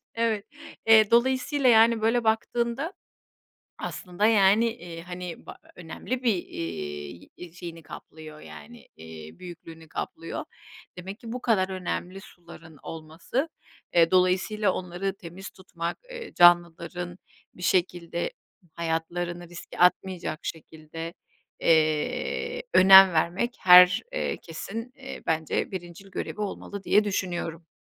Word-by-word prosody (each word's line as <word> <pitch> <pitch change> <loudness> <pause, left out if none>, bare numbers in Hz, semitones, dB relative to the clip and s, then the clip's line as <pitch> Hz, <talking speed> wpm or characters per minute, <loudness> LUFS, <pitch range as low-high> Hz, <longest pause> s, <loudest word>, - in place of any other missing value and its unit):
Evet, 225 -3 0 0.4
eee, 220 -1 +6
dolayısıyla 260 +3 +3
yani 225 0 +5
böyle 230 +2 +2
baktığında 235 +7 -1 0.9
aslında 180 +3 -2
yani, 210 +1 +5
iii, 170 -3 -9
hani 175 0 -8
ba - - -9 0.2
önemli 235 +9 -5
bir, 225 -4 +4
iii, 80 - -6
yi 175 -2 -11
şeyini 170 -2 -9
kaplıyor 155 0 -11
yani, 240 0 -13
iii, 80 0 -11
büyüklüğünü 165 -2 -11
kaplıyor. - - -5 0.5
Demek 195 +3 -7
ki 230 -2 -8
bu 250 - -4
kadar 195 -5 +2
önemli 185 0 -4
suların 165 -4 -15
olması, 165 - -4 0.5
eee, 165 -1 +5
dolayısıyla 185 +2 +2
onları 185 +2 -4
temiz 180 +2 -10
tutmak, 170 -2 -6
eee, 475 -3 -8
canlıların 175 0 +3 0.4
bir 180 - -13
şekilde 175 -1 0 0.4
hayatlarını 170 +1 -3
riske 175 0 -11
atmayacak 180 -2 +1
şekilde, 160 +1 -7 0.5
eee, 160 - +1
önem 190 0 +9
vermek 180 +9 0
her, 180 0 +8
eee, - - -2
kesin, 225 +9 -7
eee, 270 0 -9
bence 160 -1 -1
birincil 180 +1 -8
görevi 210 - -5
olmalı 200 -1 -5
diye 210 - +4
düşünüyorum. 175 -4 -3
180 Hz, 115 wpm, -26 LUFS, 165-215 Hz, 0.9 s, önem